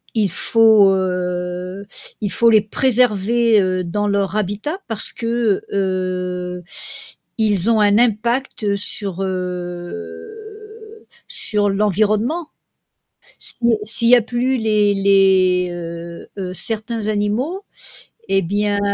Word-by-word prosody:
Il 205 -5 +1
faut, 220 -1 +4
heu, 180 +1 -3 0.4
il 205 - -2
faut 235 - +3
les 220 -2 +5
préserver, 230 -1 +2
heu, 185 -1 -1
dans 205 +4 -2
leur 200 0 -1
habitat 215 - -3
parce 225 -2 -2
que, 230 -3 -1
heu, 180 -2 -3 0.7
ils 210 -2 +2
ont 220 - +2
un 205 0 +4
impact 235 -2 0
sur, 195 -2 -1
heu, 185 - -7 0.2
sur 205 -2 +1
l'environnement. 215 - 0 0.9
Si - - -1 0.3
s'il 230 +2 +3
y 250 - +8
a 240 - +4
plus 250 +3 -1
les 210 -3 +1
les 190 -2 +3
heu, 170 0 -8
heu, 185 -1 -4
certains 220 +3 +2
animaux, 220 - -2 0.7
eh 195 - +3
bien, 205 +3 -1
205 Hz, 110 wpm, -19 LUFS, 185-225 Hz, 0.9 s, y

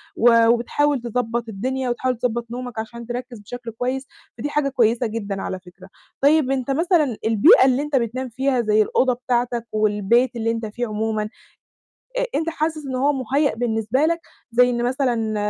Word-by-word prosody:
و 230 -1 +5
وبتحاول 245 +4 +2
تضبّط 235 -1 -2
الدنيا، 255 +5 -2
وتحاول 250 0 -1
تضبط 240 -1 -1
نومك، 245 -2 -5
عشان 235 +1 -7
تركز 245 -1 -6
بشكل 235 +3 -8
كويس. 255 +4 -3 0.3
فدي 290 +6 -3
حاجة 290 -1 0
كويسة 240 -2 +2
جدًا 205 -3 -4
على 185 - -4
فكرة. 180 +1 -16 0.3
طيب 285 -1 +4
أنت 270 0 -1
مثلًا 310 - +2
البيئة 255 - +6
اللي 265 +1 +3
أنت 295 -1 -2
بتنام 250 +1 -1
فيها 260 +1 0
زَي 215 -1 +3
الأوضة 250 +4 +2
بتاعتك، 240 -1 -1
والبيت 215 +4 +2
اللي 230 0 0
أنت 230 -1 -3
فيه 235 +3 -4
عمومًا، 215 0 -1 0.9
أ - - +1
أنت 325 +1 0
حاسس 310 -2 -2
إن 260 -1 -4
هو 280 +3 +2
مُهيأ 275 +2 0
بالنسبة 225 +1 -1
لك؟ 335 +1 0 0.3
زَي 245 +1 +5
إن 240 -1 -1
مثلًا 240 -4 0
245 Hz, 170 wpm, -22 LUFS, 225-265 Hz, 0.9 s, البيئة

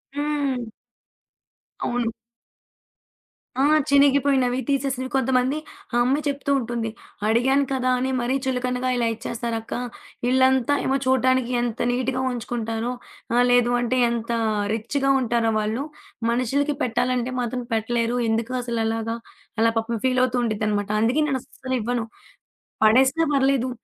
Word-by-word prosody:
హ్మ్. 285 -4 -1 1.2
అవును. 240 -1 0 1.5
ఆ! - - +4 0.3
చినిగిపోయినవి, 280 -3 +4
తీసేసినవి 265 -2 -1
కొంతమంది 260 +1 +2 0.4
ఆ - - 0
అమ్మాయి 275 +5 +1
చెప్తూ 280 0 -1
ఉంటుంది. 235 -1 -3 0.4
"అడిగాను 265 +5 +3
కదా 255 -1 0
అని 260 +1 -1
మరీ 245 +2 0
చులుకనగా 250 0 -1
ఇలా 235 - +1
ఇచ్చేస్తారక్క. 230 0 -4 0.6
ఇళ్ళంతా 260 +1 +3
ఏమో 270 +1 +2
చూడటానికి 260 -1 +2
ఎంత 240 -1 -3
నీటుగా 255 +1 -1
ఉంచుకుంటారో, 230 -1 -3 0.4
ఆహ్, 245 0 +5
లేదు 245 0 +4
అంటే 245 +1 0
ఎంత 235 0 -3 0.4
రిచ్చుగా 270 +5 -1
ఉంటారో 230 -1 +1
వాళ్ళు. 220 +6 -1 0.5
మనుషులకి 270 +5 0
పెట్టాలంటే 250 +1 0
మాత్రం 245 +1 -3
పెట్టలేరు. 230 +2 0
ఎందుకు 225 +2 -1
అసలు 235 -1 -2
అలాగా!" 225 0 -1 0.4
అలా 230 - +5
పాపం 225 +1 -1
ఫీలవుతూ 255 -1 +2
ఉండిద్దనమాట. 210 -2 -1
అందుకే 245 +7 +2
నేను 270 -3 0
అస్సలివ్వను. 245 -2 -3 0.8
పడేసీనా 260 +8 +4
పర్లేదు. 270 -2 +2
250 Hz, 115 wpm, -23 LUFS, 230-265 Hz, 1.5 s, ఆహ్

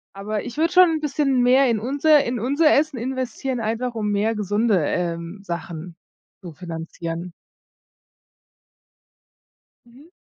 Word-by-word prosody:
Aber 205 +2 -4
ich 240 - -8
würde 330 +2 +1
schon 365 -2 +6
'n 320 -1 -1
bisschen 280 -3 0
mehr 255 +1 +4
in 225 - +1
unser 285 +5 +3
in 240 -2 -3
unser 285 +6 +3
Essen 295 -3 +1
investieren, 260 0 -3
einfach 230 +2 -2
um 210 -2 -2
mehr 210 +3 +1
gesunde, 205 -3 +1
ähm, 170 +3 -3
Sachen 170 -1 -6 0.5
zu 175 -3 -8
finanzieren. 165 +1 -6 2.5
Mhm. 265 +8 -18
230 Hz, 130 wpm, -22 LUFS, 180-270 Hz, 2.5 s, schon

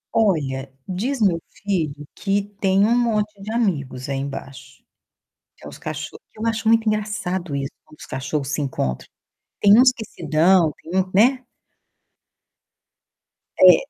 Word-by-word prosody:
Olha, 140 -11 +1 0.2
diz 235 +9 -2
meu 180 -6 +2 0.2
filho 155 -7 -1
que 200 0 0 0.2
tem 195 +1 +4
um 235 +2 +3
monte 215 -3 +1
de 210 +2 -6
amigos 145 - -1
aí 135 -1 -2
embaixo, 135 -1 -8 0.7
que - - -16
é - - -6
os - - -10
cachorros. 155 0 -7
Eu 220 +2 -4
acho 225 0 -1
muito 225 0 +4
engraçado 190 -6 -2
isso, 135 -1 -2
quando 155 - -19
os - - -10
cachorros 135 +1 -3
se 150 - -1
encontram. 65 - -2 0.5
Tem 200 - +5
uns 255 0 +7
que 245 -3 -7
se - - -10
dão, 165 +1 +4
tem 180 +4 0
um 185 0 -3
né. 250 +6 +4 2.2
É, - - +10
185 Hz, 150 wpm, -22 LUFS, 145-215 Hz, 2.2 s, É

